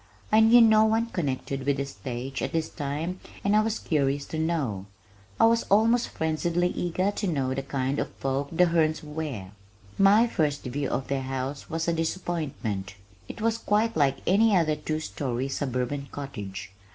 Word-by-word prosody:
I 215 - +6
knew 225 +2 +7
no 220 -1 +6
one 225 +1 +1
connected 135 -4 -2
with 140 +1 +1
the 140 - -1
stage 130 +2 -6
at - - -3
this 160 -1 0
time 155 +5 -4 0.2
and 200 +1 +2
I 215 - +6
was 225 0 -1
curious 140 -2 0
to 160 - -1
know 140 - -1 0.5
I - - +7
was 230 0 +4
almost 230 +4 +4
frenziedly 170 +2 0
eager 180 +3 0
to 205 0 -3
know 135 -6 0
the 135 - -2
kind 135 0 -2
of - - -2
folk 135 +1 -2
the 180 +2 +4
Hernes 160 -2 +1
were. 150 -11 -5 0.5
My 200 +4 +6
first 150 -10 -1
view 135 +2 -3
of 135 - -2
their 135 -1 -1
house 135 +1 -4
was 165 +1 -2
a 170 - +2
disappointment. 155 - -3 0.3
It - - -8
was 230 +1 +1
quite 220 +2 +1
like 140 -3 +2
any 205 +2 +4
other 155 -3 +2
two 155 +1 -3
story 130 -4 -3
suburban 135 +1 -2
cottage. 100 -9 -7
155 Hz, 175 wpm, -27 LUFS, 135-185 Hz, 0.5 s, knew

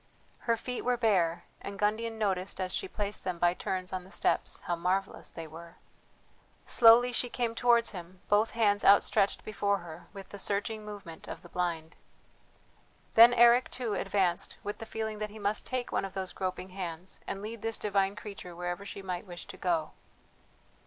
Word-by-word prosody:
Her 230 - +4
feet 250 +2 -4
were 250 0 +1
bare, 185 -8 +2 0.2
and 200 0 -7
Gundian 220 +2 0
noticed, 195 -3 -1
as 185 -1 -1
she 390 - 0
placed 210 - -3
them 180 -2 -2
by 175 0 +3
turns 185 0 -3
on 185 -1 -3
the 185 - -15
steps, - - +1
how 175 - -1
marvellous 185 +3 -1
they 165 - -7
were. 165 +2 -11 0.9
Slowly 240 +1 +7
she 245 0 -1
came 235 -1 -1
towards 235 0 +3
him, 180 -1 -9
both 210 +2 +3
hands 210 -3 +2
outstretched 200 0 +4
before 200 -1 0
her, 170 +1 -10
with 195 -1 -10
the 205 - -7
searching 210 +3 -1
movement 200 -6 -9
of - - -7
the - - -13
blind. 170 -2 -2 1.2
Then 230 +2 +9
Eric, 240 +1 +6
too, 240 -4 -3
advanced 190 -3 0
with 205 +1 -5
the 225 - -7
feeling 220 -1 -4
that 215 0 -3
he 215 - -11
must 205 0 0
take 255 -1 -2
one - - 0
of 195 0 -6
those 190 -1 -4
groping 185 0 -4
hands 180 -1 -5
and 195 - -3
lead 220 0 -6
this 225 0 -1
divine 200 -1 +1
creature 195 -4 -9
wherever 175 +2 -4
she 200 0 -8
might 180 0 -4
wish 175 -1 -8
to - - -9
go. 170 -4 -1
200 Hz, 185 wpm, -30 LUFS, 180-220 Hz, 1.2 s, Then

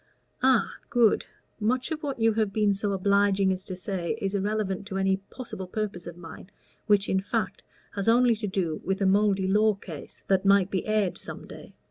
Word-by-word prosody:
"Ah 255 -5 +4 0.2
good. 235 -3 +3 0.3
Much 250 +8 0
of 310 -1 -3
what 280 -5 -4
you 225 0 +3
have 215 -2 0
been 210 -1 +2
so 200 +1 -1
obliging 200 0 +2
as 185 0 -6
to 185 - -5
say 185 +1 -3
is 195 -3 -2
irrelevant 200 -1 -1
to 195 -3 -4
any 190 0 +2
possible 195 -1 -8
purpose 200 -3 -4
of 170 0 -8
mine, 170 +2 -11 0.4
which, 205 -2 +4
in 190 - +2
fact, 205 0 -2 0.3
has 200 0 -4
only 240 +1 +5
to 210 -1 -3
do 180 -5 -2
with 190 +1 -1
a 195 - +1
mouldy 195 0 +3
law 210 +2 +3
case 170 -7 -10
that 190 -1 +2
might 195 -1 +4
be 190 - -2
aired 215 -4 +1
some - - -8
day. - - -12
200 Hz, 195 wpm, -27 LUFS, 190-215 Hz, 0.4 s, only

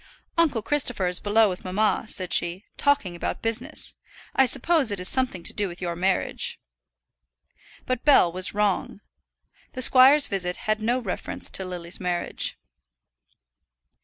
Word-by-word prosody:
"Uncle 300 -10 +1
Christopher 250 -8 +1
is 180 0 0
below 215 +1 +3
with 180 -2 -5
mamma," 210 +5 0
said 185 -5 -3
she, 175 +5 +1
"talking 280 -12 +1
about 170 - -5
business. 245 +7 -3 0.4
I 265 - +4
suppose 275 +2 +2
it 200 -2 -2
is 180 - 0
something 255 -9 +1
to - - -2
do 205 -1 -1
with 175 -1 -9
your 175 -2 -4
marriage." 185 +2 -1 1.3
But 255 -1 -3
Bell 275 - +5
was 185 +3 -2
wrong. 205 -1 -1 0.7
The 255 - 0
squire's 270 +4 +7
visit 180 -2 -2
had 215 0 0
no 235 +3 +1
reference 225 -8 -5
to 190 - 0
Lily's 175 -1 -7
marriage. 180 -2 -1
210 Hz, 145 wpm, -24 LUFS, 180-255 Hz, 1.3 s, squire's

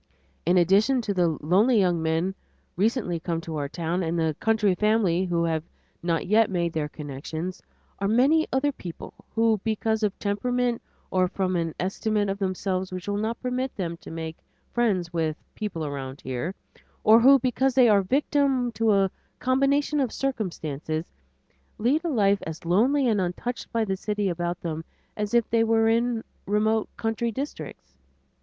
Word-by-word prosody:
In 180 +1 +4
addition 200 +9 +4
to 205 - -1
the 175 -4 +1
lonely 205 - +4
young 175 -4 +2
man 160 +4 0 0.4
recently 200 -3 0
come 165 0 -2
to 155 -4 -3
town, 170 +3 -2
and 170 0 -1
the 160 -2 +1
country 220 -3 +2
family 195 -3 +2
who 170 -2 0
have 160 -1 0 0.4
not 170 -1 0
yet 215 +3 +4
made 170 -3 -1
their 150 -2 -2
connections, 155 +5 -6 0.4
are 195 - 0
many 275 +9 +4
other 275 +2 +2
people 175 -10 -9 0.2
who, 225 -2 +3
because 220 0 0
of 210 -2 0
temperament 240 +4 0 0.3
or 185 -1 +3
from 185 0 -1
an 165 -2 -1
estimate 205 +2 0
of 195 +1 -2
themselves 185 -1 -2
which 185 +1 -6
will 205 - 0
not 220 +2 -2
permit 255 +1 -2
them 170 -4 -3
to - - -12
make 160 0 -6 0.3
friends 190 -8 0
with 160 -2 -1
the - - -36
"people 185 -7 -4
around 135 -2 -5
here," 130 +9 -4 0.5
or 220 +2 +7
who, 270 +4 +7
because 260 +1 0
they 255 -2 +6
are 205 -3 +5
victims 265 +2 +1
to 220 0 +2
a 195 -1 +3 0.3
combination 275 +3 +2
of 260 -5 0
circumstances, 160 - -3 0.7
lead 270 +9 +1
a 340 - -1
life 200 -7 +3
as 160 +1 -7
lonely 250 +10 +3
and 215 -4 +2
untouched 185 +8 -4
by 230 -1 +1
the 195 -2 -1
city 205 0 -1
about 175 0 -2
them 160 -1 -4 0.3
as 210 +2 -2
if 235 -2 +3
they 230 0 +4
were 225 0 +3
in 230 0 +1 0.2
remote 215 +2 +1
country 225 +1 -1
districts. 160 - -7
200 Hz, 170 wpm, -26 LUFS, 170-230 Hz, 0.7 s, or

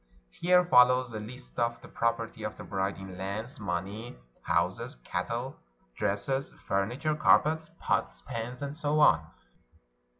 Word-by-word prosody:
Here 180 - +4
follows 125 -4 +5
a 110 - -3
list 125 +4 -9
of 120 0 0
the - - -10
property 115 -1 -1
of 110 0 -4
the - - -8
bride 95 0 -2
in 95 -1 -9
lands, 110 +7 -5
money, 100 - -4 0.2
houses, - - 0
cattle, 120 - -4 0.4
dresses, 105 - 0 0.2
fur 95 0 +2
niture, 150 +6 -1
caipets, 160 +1 +4
pots, - - -1
pans, 125 +1 -5
and 140 0 -3
so 150 -1 0
on. 90 - +6
115 Hz, 140 wpm, -30 LUFS, 100-135 Hz, 0.4 s, on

